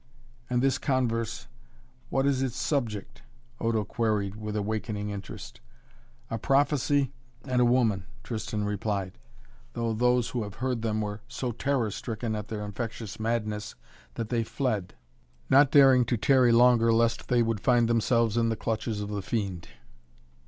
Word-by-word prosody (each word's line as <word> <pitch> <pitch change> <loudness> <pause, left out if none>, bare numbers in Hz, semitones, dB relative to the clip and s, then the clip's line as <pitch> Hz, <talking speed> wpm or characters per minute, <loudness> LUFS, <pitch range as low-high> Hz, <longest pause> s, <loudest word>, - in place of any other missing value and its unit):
"And 125 0 +1
this 135 -1 +2
converse 120 -5 -1 0.6
what 135 0 +1
is 135 -2 +2
its 130 -1 -2
subject?" 120 -8 -2 0.4
Odo 115 -2 +1
queried 105 -2 -1
with 105 -1 -5
awakening 105 0 -2
interest. 100 -1 -8 0.7
"A 115 - -2
prophecy 140 0 +2 0.3
and 125 -2 +1
a - - +5
woman," 115 -6 +2 0.2
Tristan 110 -2 -3
replied. 100 -2 -2 0.5
"Though 115 -1 -1
those 125 +1 +2
who 115 -5 -3
heard 125 +3 -3
them 110 -1 -1
were 105 0 -4
so 125 -2 -3
terror 120 -2 0
stricken 115 +1 -4
at 105 -1 -5
their 105 -2 -4
infectious 110 0 -6
madness 110 -2 -2 0.4
that 115 -1 -4
they 120 -2 +1
fled 110 -7 -2 0.6
not 140 +1 +7
daring 135 -3 +6
to 120 +1 0
tarry 125 +2 +4
longer 115 -1 +5
lest 115 0 +1
they 120 -1 +3
would 115 -2 -1
find 120 +2 +3
themselves 115 -1 +2
in 115 -1 +2
the 115 - 0
clutches 110 -1 -2
of 105 - -4
the 105 -1 -3
fiend." 95 -5 -3
115 Hz, 150 wpm, -28 LUFS, 105-125 Hz, 0.7 s, not